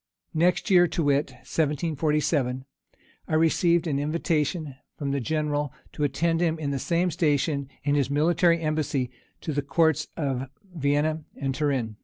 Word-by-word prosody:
Next 180 Hz, +6 st, +2 dB
year, 175 Hz, -1 st, +6 dB
to 165 Hz, -, -1 dB
wit, 145 Hz, 0 st, +2 dB, 0.2 s
1747, 150 Hz, -3 st, 0 dB, 0.6 s
I -, -, -4 dB
received 170 Hz, +1 st, +3 dB
an 145 Hz, -4 st, 0 dB
invitation 155 Hz, 0 st, -1 dB, 0.2 s
from 140 Hz, -1 st, -2 dB
the 140 Hz, -, 0 dB
general 150 Hz, 0 st, -1 dB, 0.2 s
to 150 Hz, -, -3 dB
attend 165 Hz, +4 st, +1 dB
him 165 Hz, -2 st, +1 dB
in 145 Hz, -3 st, -3 dB
the 140 Hz, -, -1 dB
same 175 Hz, +5 st, +1 dB
station 145 Hz, -3 st, 0 dB
in 145 Hz, 0 st, +1 dB
his 140 Hz, -2 st, +1 dB
military 170 Hz, +3 st, +3 dB
embassy 150 Hz, -5 st, -1 dB, 0.3 s
to 155 Hz, -, -3 dB
the 145 Hz, -, 0 dB
courts 160 Hz, +2 st, +2 dB
of 135 Hz, -4 st, -2 dB, 0.3 s
Vienna 150 Hz, +1 st, +1 dB
and 135 Hz, -1 st, -2 dB
Turin. 130 Hz, -7 st, -1 dB
150 Hz, 150 wpm, -26 LUFS, 140-165 Hz, 0.6 s, year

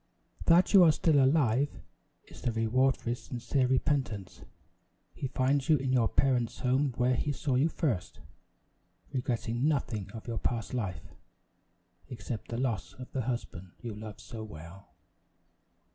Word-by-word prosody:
"That 175 Hz, +5 st, +5 dB
you 195 Hz, -3 st, +9 dB
are 165 Hz, -, +7 dB
still 150 Hz, -2 st, +3 dB
alive, 135 Hz, -1 st, +3 dB, 0.6 s
is -, -, -14 dB
the 120 Hz, -, 0 dB
reward 120 Hz, +4 st, +2 dB
for 120 Hz, -, -3 dB
his 120 Hz, -, -4 dB
sincere 125 Hz, +1 st, -1 dB
repentance. 130 Hz, -, -1 dB, 0.7 s
He 135 Hz, -, -4 dB
finds 135 Hz, +2 st, 0 dB
you 155 Hz, -, +6 dB
in 130 Hz, -1 st, -1 dB
your 120 Hz, -3 st, +4 dB
parents' 125 Hz, -3 st, +1 dB
home 130 Hz, 0 st, +1 dB
where 125 Hz, +1 st, +3 dB
he 145 Hz, +4 st, 0 dB
saw 140 Hz, 0 st, -2 dB
you 135 Hz, +6 st, +3 dB
first, 130 Hz, -, -2 dB, 0.9 s
regretting 120 Hz, 0 st, -1 dB
nothing 115 Hz, -9 st, -1 dB
of 110 Hz, -, -8 dB
your 115 Hz, -2 st, -2 dB
past 115 Hz, -1 st, -2 dB
life, 95 Hz, -, -3 dB, 1.0 s
except 115 Hz, -2 st, -6 dB
the 115 Hz, -, -4 dB
loss 120 Hz, -7 st, -2 dB
of 125 Hz, 0 st, -10 dB
the 130 Hz, -, -1 dB
husband 110 Hz, -7 st, -5 dB
you 115 Hz, -2 st, -6 dB
love 105 Hz, 0 st, -8 dB
so 110 Hz, -2 st, -8 dB
well." 85 Hz, -1 st, -11 dB
125 Hz, 150 wpm, -30 LUFS, 110-135 Hz, 1.0 s, you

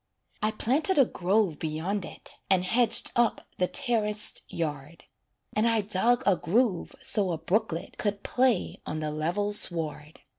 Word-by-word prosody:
I 215 Hz, -, +2 dB
planted 275 Hz, -, +1 dB
a 275 Hz, -, +7 dB
grove 190 Hz, -4 st, 0 dB
beyond 165 Hz, +5 st, -2 dB
it, -, -, -12 dB, 0.2 s
And 190 Hz, -2 st, +3 dB
hedged 230 Hz, +2 st, +2 dB
up 240 Hz, -1 st, +1 dB
the 180 Hz, -, +2 dB
terraced 220 Hz, -6 st, 0 dB
yard, 150 Hz, -1 st, -5 dB, 0.5 s
And 215 Hz, +2 st, +3 dB
I 225 Hz, -1 st, +3 dB
dug 225 Hz, +5 st, +1 dB
a 200 Hz, -, +5 dB
groove 205 Hz, +1 st, 0 dB
so 200 Hz, -4 st, +1 dB
a 165 Hz, -, -1 dB
brooklet 180 Hz, 0 st, -2 dB
Could 205 Hz, -1 st, -2 dB
play 250 Hz, -6 st, +1 dB
on 155 Hz, -, -4 dB
the 155 Hz, -1 st, -2 dB
level 175 Hz, +7 st, -1 dB
sward. 160 Hz, -5 st, -2 dB
205 Hz, 150 wpm, -28 LUFS, 165-230 Hz, 0.5 s, a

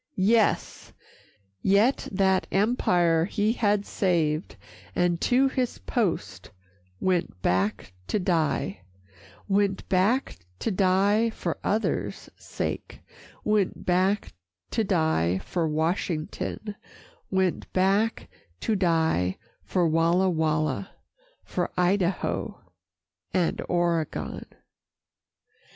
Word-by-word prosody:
Yes! 215 Hz, +3 st, +1 dB, 0.7 s
yet 205 Hz, +7 st, +3 dB
that 190 Hz, -1 st, +2 dB
empire 175 Hz, -6 st, +2 dB
he 210 Hz, +3 st, 0 dB
had 205 Hz, -3 st, +1 dB
saved, 165 Hz, -4 st, 0 dB, 0.4 s
And 175 Hz, -1 st, +1 dB
to 260 Hz, +2 st, +3 dB
his 255 Hz, -2 st, -1 dB
post 105 Hz, -, -2 dB, 0.5 s
went 180 Hz, -, 0 dB
back 95 Hz, +1 st, 0 dB
to -, -, 0 dB
die, 160 Hz, -, 0 dB, 0.7 s
Went 200 Hz, -1 st, +1 dB
back 200 Hz, +8 st, +1 dB, 0.2 s
to 225 Hz, -, -2 dB
die 200 Hz, +4 st, +3 dB
for 220 Hz, -, -4 dB
others' 215 Hz, +2 st, -1 dB
sake, -, -, -5 dB, 0.4 s
Went 210 Hz, -3 st, 0 dB
back 185 Hz, +3 st, +1 dB, 0.4 s
to 225 Hz, -, +1 dB
die 160 Hz, -, +1 dB
from 160 Hz, -, -2 dB
Washington, 165 Hz, +5 st, -2 dB, 0.5 s
Went 190 Hz, -2 st, 0 dB
back 195 Hz, +4 st, +1 dB, 0.3 s
to 220 Hz, -, +1 dB
die 160 Hz, -, +1 dB, 0.3 s
for 180 Hz, -3 st, +1 dB
Walla 170 Hz, +4 st, +3 dB
Walla, 155 Hz, +1 st, -1 dB, 0.5 s
For -, -, -2 dB
Idaho 180 Hz, +1 st, 0 dB, 0.8 s
and 180 Hz, -3 st, +1 dB
Oregon. 170 Hz, -3 st, -1 dB
185 Hz, 90 wpm, -26 LUFS, 165-205 Hz, 0.8 s, yet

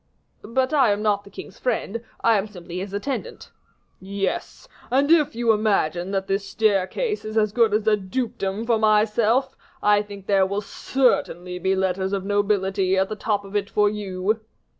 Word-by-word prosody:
"But 260 Hz, +5 st, 0 dB
I 270 Hz, -6 st, +5 dB
am 205 Hz, +1 st, -1 dB
not 205 Hz, -1 st, +1 dB
the -, -, -12 dB
king's 200 Hz, -, -11 dB
friend; 230 Hz, -2 st, -2 dB, 0.2 s
I 230 Hz, -1 st, +4 dB
am 195 Hz, -, -3 dB
simply 180 Hz, -3 st, -8 dB
his 190 Hz, +1 st, -5 dB
attendant." 275 Hz, -, -5 dB, 0.5 s
"Yes; 195 Hz, -, -4 dB, 0.2 s
and 275 Hz, +4 st, +2 dB
if 305 Hz, -7 st, +4 dB
you 235 Hz, -1 st, +2 dB
imagine 195 Hz, -5 st, +1 dB
that 195 Hz, -1 st, -1 dB
that 195 Hz, 0 st, 0 dB
staircase 215 Hz, -, 0 dB
is 215 Hz, +1 st, -4 dB
as 215 Hz, -1 st, +3 dB
good 230 Hz, -1 st, +3 dB
as 210 Hz, +1 st, +1 dB
a 215 Hz, -1 st, +4 dB
dukedom 205 Hz, 0 st, -3 dB
for 230 Hz, -2 st, +2 dB
myself, 220 Hz, +4 st, +2 dB, 0.3 s
I 205 Hz, 0 st, +5 dB
think 200 Hz, -2 st, -10 dB
there 195 Hz, -2 st, +3 dB
will 200 Hz, +2 st, -2 dB
certainly 180 Hz, -8 st, 0 dB
be 190 Hz, +2 st, +1 dB
letters 190 Hz, 0 st, -1 dB
of 195 Hz, -1 st, -2 dB
nobility 195 Hz, -2 st, +1 dB
at 190 Hz, 0 st, +1 dB
the 215 Hz, -, -3 dB
top 205 Hz, -1 st, -1 dB
of 195 Hz, +1 st, -10 dB
it 200 Hz, -1 st, 0 dB
for 210 Hz, -1 st, +2 dB
you." 205 Hz, +1 st, -2 dB
205 Hz, 180 wpm, -23 LUFS, 195-225 Hz, 0.5 s, I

